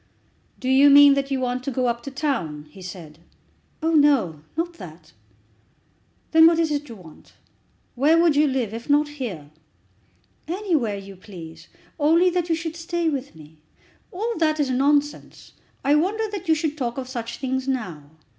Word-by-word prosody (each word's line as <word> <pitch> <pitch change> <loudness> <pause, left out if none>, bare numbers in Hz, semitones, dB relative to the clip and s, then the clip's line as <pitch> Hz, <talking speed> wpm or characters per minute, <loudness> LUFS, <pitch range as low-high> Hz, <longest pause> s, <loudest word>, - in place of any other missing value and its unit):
"Do 255 - -5
you 270 +2 +6
mean 285 0 +8
that 275 0 -1
you 270 -1 -1
want 250 0 -2
to 275 - -3
go 255 -1 -1
up 235 -1 -1
to 275 - -7
town?" 260 - -3
he 190 - -14
said. 175 -4 -10 0.6
"Oh, 325 - +1
no; 275 - +3 0.2
not 345 +1 -2
that." 160 -3 -12 1.2
"Then 320 0 +7
what 335 0 +3
is 325 -2 +1
it 295 -1 -3
you 230 - -8
want? 170 -6 -16 0.6
Where 300 +6 +3
would 335 -3 +3
you 300 +1 +4
live, 255 -6 -2
if 230 +4 -8
not 295 +1 +3
here?" 210 - -7 1.0
"Anywhere 325 - -1
you 195 0 -10
please, 175 -4 -12 0.3
only 335 +5 +4
that 350 -1 -2
you 325 - +2
should 325 0 -5
stay 340 0 -2
with 280 - -5
me." 155 0 -16 0.5
"All 445 +6 -3
that 310 -1 +1
is 280 -3 0
nonsense. 285 +3 -1 0.3
I 285 - +4
wonder 400 +9 +1
that 400 -5 -6
you 320 - +4
should 305 -1 -3
talk 240 -1 -3
of 260 -1 -5
such 235 -2 -6
things 260 0 -3
now. 185 - -3
275 Hz, 175 wpm, -23 LUFS, 225-315 Hz, 1.2 s, mean